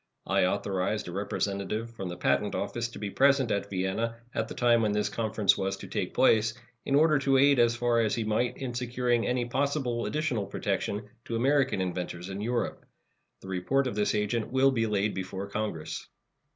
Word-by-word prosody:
I - - +2
authorized 95 +2 -1
a - - -5
representative 100 +3 -2
from 95 -6 -6
the 90 - -6
Patent 70 0 +1
Office 120 0 -2
to 120 - -11
be 105 -2 -4
present 135 -1 +3
at 100 0 -1
Vienna 95 +5 -1 0.2
at 110 - -1
the - - -8
time 120 -1 +4
when 105 -2 +1
this 105 0 0
conference 110 -1 +2
was 95 0 -1
to - - -9
take - - -3
place, 110 +1 +4 0.3
in 135 - +1
order 155 0 +5
to 135 -1 +3
aid 140 0 +5
as 120 0 +4
far 120 -1 +2
as 110 -2 +1
he 115 - -1
might 115 +3 0
in 130 -3 -4
securing 120 -1 0
any 125 -1 0
possible 130 -2 -1
additional 150 -10 -1
protection 105 +1 -2 0.2
to 115 - -3
American 135 -2 +2
inventors 90 0 -4
in 95 +1 -5
Europe. 120 +2 -2 0.6
The 95 - -10
report 95 +10 +1
of 125 - -2
this 105 0 +1
agent 105 +2 -1
will 135 +1 +4
be 115 -3 +1
laid 105 0 0
before 95 +1 -4
Congress. 100 -6 -4
115 Hz, 190 wpm, -28 LUFS, 100-125 Hz, 0.6 s, order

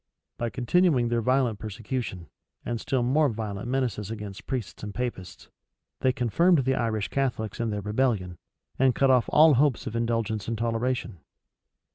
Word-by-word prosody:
By 120 - -1
continuing 130 0 +2
their 120 0 +1
violent 125 -3 +1
persecution, 110 -3 -5 0.4
and 120 -1 -3
still 130 -3 0
more 145 +4 +3
violent 105 -2 -4
menaces 120 -6 -1
against 105 -1 -7
priests 125 -7 -4
and 105 -1 -7
Papists, 120 -7 -5 0.5
they 130 - +3
confirmed 135 - +2
the 130 - +2
Irish 110 -5 -1
Catholics 125 -6 -2
in 115 -1 0
their 105 -1 -3
rebellion, 105 -5 -1 0.4
and 130 -1 +4
cut 135 -1 +4
off 125 -2 +3
all 155 0 +6
hopes 135 -1 +2
of 110 - -5
indulgence 115 -2 -1
and 115 0 -2
toleration. 115 -3 -2
115 Hz, 155 wpm, -26 LUFS, 110-130 Hz, 0.5 s, all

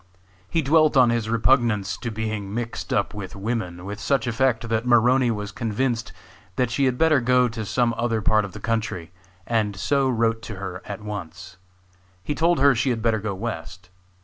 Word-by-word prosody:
He 165 - 0
dwelt 155 +1 +4
on 125 -2 +6
his 115 -2 -1
repugnance 115 -5 +2
to 120 - -4
being 110 -2 -4
mixed 115 +1 -4
up 100 +1 0
with 100 -3 -7
women 100 -4 -4
with 105 +1 -6
such 135 +2 +1
effect 120 0 +1
that 115 +1 -1
Maroney 125 +1 +4
was 105 -2 -3
convinced 115 +2 -2 0.4
that 125 +1 0
she 135 +3 +1
had 125 -1 +1
better 155 -3 +4
go 125 +1 +3
to 110 -1 -5
some 120 +3 +1
other 115 -1 0
part 110 0 +3
of 100 - -7
the 110 - -8
country, 110 -6 -2 0.3
and 110 -3 0
so 135 +7 +1
wrote 115 -2 +1
to 110 - -7
her 95 -1 -6
at 100 0 -6
once. 90 -3 -7 0.7
He 150 - -2
told 170 +3 +2
her 140 +1 +5
she 125 +3 0
had 115 -3 -1
better 115 -2 +2
go 100 -2 -3
west. 95 -3 -6
115 Hz, 190 wpm, -24 LUFS, 105-125 Hz, 0.7 s, on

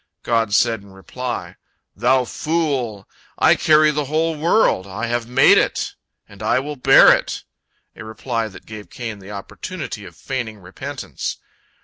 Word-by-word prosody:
God 115 -3 +1
said 115 0 +2
in 100 -1 -16
reply: 120 +6 -6 0.4
"Thou 130 +1 +2
fool! 135 - -2 0.3
I - - +5
carry 155 -1 +4
the 150 0 -2
whole 160 +3 0
world. 155 - +2
I 105 +4 -4
have 120 -1 -2
made 125 - +6
it, - - -1 0.3
and 100 0 -15
I 110 - +2
will 145 +3 -3
bear 125 - +7
it"—a - - -9
reply 115 +1 -3
that 100 - -13
gave 105 -1 -10
Cain 115 -5 -6
the 95 0 -12
opportunity 105 - -7
of 85 -3 -12
feigning 115 +3 -5
repentance. 90 -2 -6
120 Hz, 145 wpm, -20 LUFS, 105-145 Hz, 0.4 s, bear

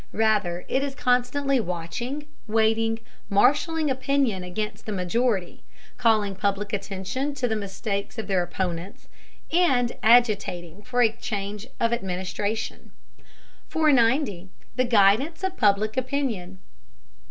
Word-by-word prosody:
Rather, 210 -6 +1
it 265 - +1
is 275 -1 -3
constantly 255 +2 +1
watching, 225 - -4 0.2
waiting, 225 +1 +2 0.3
marshaling 300 - +3
opinion 260 -7 0
against 210 +4 -5
the - - -2
majority, 195 0 -1 0.4
calling 215 -4 +3
public 200 +2 -1
attention 205 +8 -3
to 255 -3 0
the 220 - 0
mistakes 200 0 -4
of 220 - -3
their 190 -2 +1
opponents, 175 +1 -4 0.5
and 265 -9 +3
agitating 205 -6 +3
for 245 +2 +1
a 225 - +4
change 210 -1 -5
of 230 0 +2
administration. 190 +2 -3 0.8
490. 255 - +2 0.3
THE 255 - +2
GUIDANCE 240 - +3
OF 380 -1 -1
PUBLIC 210 - +2
OPINION. 250 -9 -2
220 Hz, 115 wpm, -25 LUFS, 195-255 Hz, 0.8 s, a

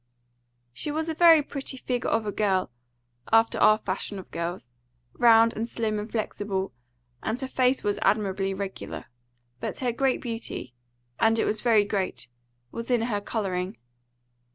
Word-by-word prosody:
She 130 - -4
was 315 +2 -1
a - - 0
very 325 -2 +7
pretty 275 -2 -4
figure 250 -1 -2
of 225 -1 +1
a 205 - -1
girl, 190 - 0 0.6
after 225 0 +4
our 215 0 +6
fashion 200 0 -4
of 190 - -10
girls, 170 -7 -4 0.4
round 230 -1 +6
and 230 +2 -3
slim 215 -2 -1
and 210 +2 -6
flexible, 205 - -2 0.5
and 220 +3 -2
her 265 - -3
face 255 0 +1
was 205 -1 0
admirably 195 -1 +1
regular. 195 0 -6 0.5
But - - -4
her 250 -2 0
great 265 +2 +1
beauty 225 - -5 0.5
and 225 0 +4
it - - +2
was 215 - 0
very 225 -4 +4
great 200 -2 -3 0.4
was 230 +1 -6
in 240 -2 +2
her 210 -4 -1
colouring. 190 - -3
220 Hz, 155 wpm, -26 LUFS, 195-240 Hz, 0.6 s, very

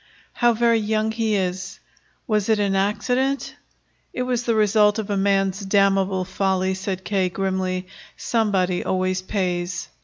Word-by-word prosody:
"How 240 -1 +3
very 230 0 +3
young 215 +1 0
he 220 -1 0
is! 190 0 -3 0.5
Was 215 -2 0
it 220 - +4
an 200 -1 0
accident?" 250 +7 0 0.6
"It 250 - -2
was 245 -1 -1
the 230 - +1
result 210 0 +3
of 210 -2 -3
a - - +1
man's 195 -1 +1
damnable 195 -1 +2
folly," 190 0 0
said 190 0 -4
K. 190 -2 0
grimly. 185 -1 -2 0.3
"Somebody 195 -6 0
always 185 0 0
pays." 180 -2 -2
195 Hz, 145 wpm, -22 LUFS, 190-220 Hz, 0.6 s, it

